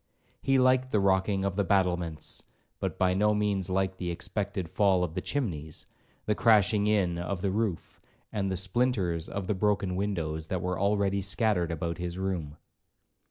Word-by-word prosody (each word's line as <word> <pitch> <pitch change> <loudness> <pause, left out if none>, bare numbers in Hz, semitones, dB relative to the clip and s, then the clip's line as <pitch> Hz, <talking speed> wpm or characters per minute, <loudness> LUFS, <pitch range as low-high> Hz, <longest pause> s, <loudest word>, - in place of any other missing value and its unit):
He 135 0 +3
'liked 130 0 +3
the 110 - +2
rocking 95 0 +2
of 100 -1 -1
the 100 - +2
battlements,' 90 -4 0 0.4
but - - -3
by 90 -1 +3
no 105 +2 +3
means 100 -3 0
liked 95 0 0
the 90 - -2
expected 95 +1 -3
fall 95 0 +2
of 85 -3 -3
the 90 - -2
chimneys, 80 - -3 0.4
the 105 - +2
crashing 105 -2 +4
in 95 -5 +1
of 90 +1 -3
the 100 - +1
roof, 105 -4 -2 0.3
and 100 -3 -1
the 95 - -1
splinters 95 -4 0
of 100 -1 -4
the 105 - 0
broken 100 -1 0
windows 80 -6 -2
that 95 - -2
were 90 -1 -2
already 100 0 +1
scattered 95 -3 +1
about 85 +1 -3
his 90 0 -4
room. 90 -6 -3
95 Hz, 170 wpm, -29 LUFS, 90-105 Hz, 0.4 s, crashing